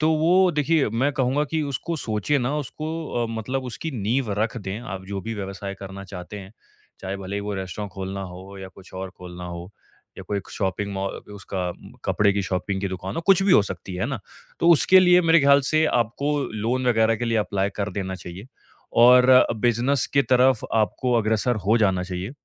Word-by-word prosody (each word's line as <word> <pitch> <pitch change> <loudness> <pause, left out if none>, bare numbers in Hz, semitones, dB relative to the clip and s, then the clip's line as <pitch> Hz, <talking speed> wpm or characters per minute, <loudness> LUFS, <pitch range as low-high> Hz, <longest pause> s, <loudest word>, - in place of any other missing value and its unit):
तो 155 +1 +3
वो 180 +4 +4
देखिए, 150 -1 +2
मैं 130 +6 +1
कहूँगा 135 +2 +1
कि 160 -1 0
उसको 165 +6 -3
सोचिए 115 +2 -1
ना, 130 +3 -1
उसको 155 -2 -4
अ, - - -2
मतलब 120 +4 -3
उसकी 130 +6 -5
नींव 115 0 -1
रख 115 +2 -2
दें, 100 +1 -5
आप 95 -5 -7
जो 100 0 -4
भी 115 0 -4
व्यवसाय 100 -1 -5
करना 100 0 -8
चाहते 95 +1 -8
हैं। 95 0 -11 0.5
चाहे 95 +1 -4
भले 100 +1 -5
ही - - -2
वो 105 0 -4
रेस्टोरेंट 95 +1 -5
खोलना 95 +1 -5
हो 95 +1 -9
या 95 -1 -8
कुछ 95 -1 -16
और 95 0 -5
खोलना 90 0 -9
हो 85 +1 -7 0.5
या - - -6
कोई 100 -1 -1
क - - -14
शॉपिंग 100 0 -2
मौ 95 0 -2
अ, - - -7
उसका 95 -3 -4
उम, - - -13
कपड़े 100 -1 +3
की 100 - 0
शॉपिंग 95 +1 -2
की 100 - -2
दुकान 95 +1 -5
हो, - - 0
कुछ 195 -1 +5
भी 195 - +4
हो 105 - +7
सकती 95 -1 -7
है 95 - -1
ना। 135 -2 -3 0.4
तो 170 - +4
उसके 185 +3 +6
लिए 180 -1 +6
मेरे 165 0 +5
ख़्याल 140 0 +6
से 155 0 +3
आपको 140 +4 0
लोन 120 +4 -1
वगैरह 115 -1 +3
के 120 - -3
लिए 115 -1 +1
अप्लाई 100 -1 -1
कर 105 0 -2
देना 95 -1 -3
चाहिए 90 +3 -9 0.6
और 125 +1 +7
बिज़नेस 120 +4 +1
की 140 - +5
तरफ 130 -2 +3
आपको 115 +3 +1
अग्रसर 110 +2 +1
हो 110 +3 +4
जाना 95 -4 +2
चाहिए, 90 +2 -5
110 Hz, 210 wpm, -24 LUFS, 95-130 Hz, 0.6 s, हो